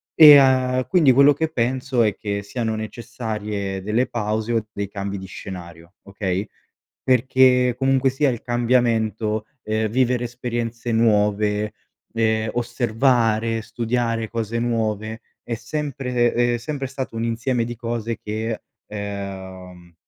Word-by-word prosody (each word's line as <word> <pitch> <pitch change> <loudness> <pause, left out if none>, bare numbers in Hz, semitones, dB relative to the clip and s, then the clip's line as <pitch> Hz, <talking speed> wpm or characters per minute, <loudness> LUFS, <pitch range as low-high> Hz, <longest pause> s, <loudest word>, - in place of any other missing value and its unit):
E, 150 -3 +10
uhm, 130 -1 +2
quindi 165 -8 +5
quello 140 +3 +6
che 160 +3 -1
penso 130 -1 0
è 105 -2 +1
che 100 -1 -3
siano 110 +1 -3
necessarie 110 -3 -4
delle 110 +5 +1
pause 110 +1 -2
o 115 -1 0
dei 100 0 -3
cambi 100 0 -4
di 95 - -8
scenario, 85 -2 -10
okay? 100 0 -3 0.6
Perché 125 0 +4
comunque, 135 0 +2
sia 140 +2 +1
il 120 -2 -5
cambiamento, 115 -3 +1 0.2
uhm, 110 +1 0
vivere 125 +1 +1
esperienze 120 -1 -4
nuove, 105 -1 +2 0.4
ehm, 110 -1 +1
osservare, 115 -2 +1
studiare 115 0 -2
cose 115 0 -3
nuove 110 -2 -2 0.2
è 120 - -4
sempre, 125 0 -1
ehm, 120 0 +2
è - - +1
sempre 135 +2 -4
stato 130 -3 -6
un 115 - -1
insieme 115 +1 0
di 120 +1 -5
cose 115 -1 -3
che 110 +1 -3 0.2
ehm, 95 -4 -7
115 Hz, 130 wpm, -22 LUFS, 105-125 Hz, 0.6 s, E